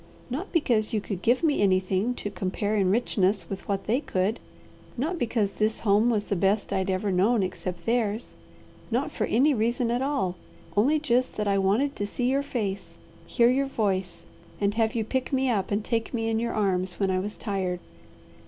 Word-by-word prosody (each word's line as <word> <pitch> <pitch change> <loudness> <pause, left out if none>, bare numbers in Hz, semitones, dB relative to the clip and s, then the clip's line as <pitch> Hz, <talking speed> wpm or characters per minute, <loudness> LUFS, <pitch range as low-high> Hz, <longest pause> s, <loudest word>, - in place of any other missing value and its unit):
Not 315 +10 -4
because 240 - +1
you 215 - +2
could 195 -2 -5
give 245 - +2
me 300 -7 +2
anything 190 +4 +2
to 205 - -5
compare 200 +2 -2
in 195 -3 +2
richness 195 -4 +1
with 195 - -6
what 195 -1 -1
they 235 +5 +2
could, 200 -4 -1 0.6
not 320 +8 -1
because 220 -5 0
this 215 +2 -1
home 210 +2 +3
was 210 -3 +1
the 200 - -1
best 195 +3 +1
I'd 190 0 0
ever 190 +2 0
known 200 +4 +3
except 180 -1 -5
theirs, 225 -1 0 0.6
not - - 0
for - - -1
any 280 +6 +3
reason 235 +1 0
at 240 +1 0
all 265 -11 -1 0.4
only 265 +10 +4
just 255 -4 0
that 210 -1 -1
I 200 0 +2
wanted 220 +10 +1
to 205 - -2
see 245 +4 -1
your 275 +1 +2
face, 215 -9 -4 0.3
hear 235 0 +4
your 275 +2 +1
voice, 195 -7 -2 0.3
and 200 0 +1
have 220 0 +1
you 225 - +1
pick 260 +4 -2
me 265 -1 +2
up 195 -4 0
and 205 +1 -1
take 230 +1 -1
me 225 -1 -1
in 225 0 +1
your 235 0 -2
arms 185 -3 0
when 195 -2 +2
I 185 - +1
was 205 +3 -4
tired. 190 -4 -2
215 Hz, 200 wpm, -26 LUFS, 195-245 Hz, 0.6 s, only